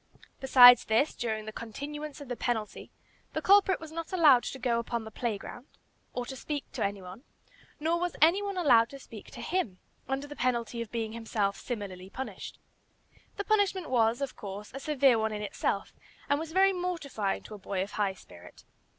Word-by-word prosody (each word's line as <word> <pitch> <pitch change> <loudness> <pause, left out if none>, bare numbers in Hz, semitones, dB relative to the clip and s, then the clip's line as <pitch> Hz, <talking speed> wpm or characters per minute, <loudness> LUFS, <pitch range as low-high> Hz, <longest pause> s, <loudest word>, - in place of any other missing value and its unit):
Besides 245 -2 +8
this, 225 +7 +2
during 220 -2 -3
the 215 - -6
continuance 290 +8 -7
of 285 - -9
the 245 - -3
penalty 225 -3 -3 0.4
the - - -2
culprit 390 -1 +5
was 320 -1 -10
not 330 0 -6
allowed 305 -9 +6
to - - -5
go 245 -2 0
upon 235 0 -3
the 220 - -9
play 225 -1 -2
ground, 245 +6 -10 0.4
or 245 - -4
to 265 - -7
speak 290 +2 -4
to 240 - -3
any 200 -1 -2
one, 185 +7 -10 0.6
nor 325 +3 +1
was 355 0 -2
any 335 +6 +5
one 400 -2 -4
allowed 245 -9 +5
to 275 - -9
speak 225 -5 -12
to - - -9
him, 315 - -2 0.3
under 270 +1 -2
the 290 0 -9
penalty 235 -2 -1
of 230 - -6
being 225 -2 -3
himself 220 -3 -1
similarly 195 -6 -6
punished. 265 +6 -7 0.8
The 405 - -2
punishment 400 -6 +1
was, 235 0 +2
of 275 - -3
course, 205 +1 -8
a 270 - -5
severe 275 -4 +3
one 220 0 -1
in 210 0 -4
itself, 200 0 -2 0.3
and 285 +1 +2
was 320 0 -6
very 385 +2 +4
mortifying 325 - -2
to - - -10
a 210 - -9
boy 190 -1 -2
of 200 - -8
high 200 -2 -1
spirit. 90 - -15
245 Hz, 195 wpm, -29 LUFS, 215-300 Hz, 0.8 s, Besides